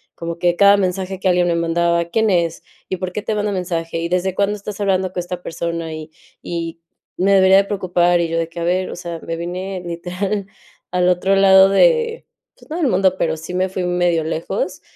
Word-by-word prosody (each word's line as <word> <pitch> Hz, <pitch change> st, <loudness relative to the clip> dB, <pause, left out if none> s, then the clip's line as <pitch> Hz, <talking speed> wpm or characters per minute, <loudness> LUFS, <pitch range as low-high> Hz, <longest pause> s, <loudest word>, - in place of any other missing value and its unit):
como 170 Hz, 0 st, -6 dB
que 175 Hz, 0 st, +2 dB
cada 200 Hz, +2 st, +6 dB
mensaje 190 Hz, 0 st, -2 dB
que 195 Hz, -, -1 dB
alguien 180 Hz, -1 st, +3 dB
me 170 Hz, -, +2 dB
mandaba, 170 Hz, 0 st, +1 dB
¿quién 220 Hz, +6 st, +1 dB
es? 170 Hz, -2 st, 0 dB, 0.3 s
¿Y 185 Hz, -, -2 dB
por 185 Hz, 0 st, -4 dB
qué 210 Hz, -, -3 dB
te 215 Hz, +1 st, -2 dB
manda 210 Hz, 0 st, -1 dB
mensaje? 170 Hz, -3 st, -3 dB
¿Y 165 Hz, -, -2 dB
desde 180 Hz, +1 st, 0 dB
cuándo 200 Hz, +2 st, 0 dB
estás 205 Hz, 0 st, -7 dB
hablando 190 Hz, -2 st, +1 dB
con 185 Hz, -, -3 dB
esta 180 Hz, 0 st, -5 dB
persona? 165 Hz, -1 st, -4 dB
¿Y 155 Hz, 0 st, -8 dB, 0.3 s
y 165 Hz, -1 st, -5 dB, 0.4 s
me 195 Hz, +2 st, +3 dB
debería 190 Hz, 0 st, +6 dB
de 200 Hz, -, +4 dB
preocupar? 175 Hz, -3 st, +1 dB
Y 170 Hz, -, 0 dB
yo 165 Hz, -, -1 dB
de 165 Hz, 0 st, -2 dB
que, 170 Hz, -, -8 dB
a -, -, -1 dB
ver, 180 Hz, +2 st, 0 dB
o -, -, -6 dB
sea, 170 Hz, -2 st, -6 dB
me 165 Hz, -, -5 dB
vine, 180 Hz, +3 st, -5 dB
literal, 185 Hz, +4 st, -3 dB, 0.4 s
al 180 Hz, 0 st, +2 dB
otro 180 Hz, +2 st, +2 dB
lado 190 Hz, 0 st, +7 dB
de, 465 Hz, -, +2 dB, 0.3 s
pues, -, -, -20 dB
no 320 Hz, -, -3 dB
del 330 Hz, -5 st, +1 dB
mundo, 190 Hz, -3 st, +2 dB
pero 160 Hz, -1 st, 0 dB
sí 160 Hz, +3 st, -8 dB
me 185 Hz, +1 st, 0 dB
fui 185 Hz, 0 st, -3 dB
un 180 Hz, 0 st, -1 dB
medio 170 Hz, -2 st, +2 dB
lejos, 165 Hz, -, -3 dB
180 Hz, 225 wpm, -19 LUFS, 170-195 Hz, 0.4 s, lado